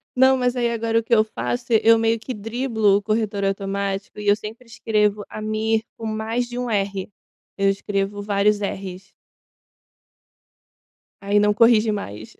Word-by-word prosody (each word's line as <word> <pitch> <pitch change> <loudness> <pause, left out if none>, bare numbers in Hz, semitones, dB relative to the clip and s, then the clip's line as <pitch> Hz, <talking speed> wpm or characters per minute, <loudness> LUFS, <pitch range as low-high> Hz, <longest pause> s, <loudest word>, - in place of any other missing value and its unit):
Não, 260 +1 +5
mas 250 0 0
aí 240 -1 +1
agora 230 0 0
o - - -5
que 230 - -1
eu 215 -1 +6
faço, 120 - -4 0.2
eu 230 0 +6
meio 225 0 +1
que 255 - -6
driblo 220 -2 +1
o 205 - -3
corretor 215 -2 -1
automático 195 +1 -3
e 205 - -5
eu 205 - +6
sempre 220 +3 -10
escrevo 210 -3 0
Amir 215 +1 -1
com 225 - -7
mais 220 +3 -2
de 240 0 -7
um 250 -1 -2
R, 195 -2 -2 0.5
eu 195 0 +3
escrevo 200 +1 -2
vários 205 0 +1
erres. 195 -1 -5 2.1
Aí 200 +1 +2
não 210 0 +3
corrige 225 0 +4
mais. 110 - -6
215 Hz, 160 wpm, -22 LUFS, 200-230 Hz, 2.1 s, eu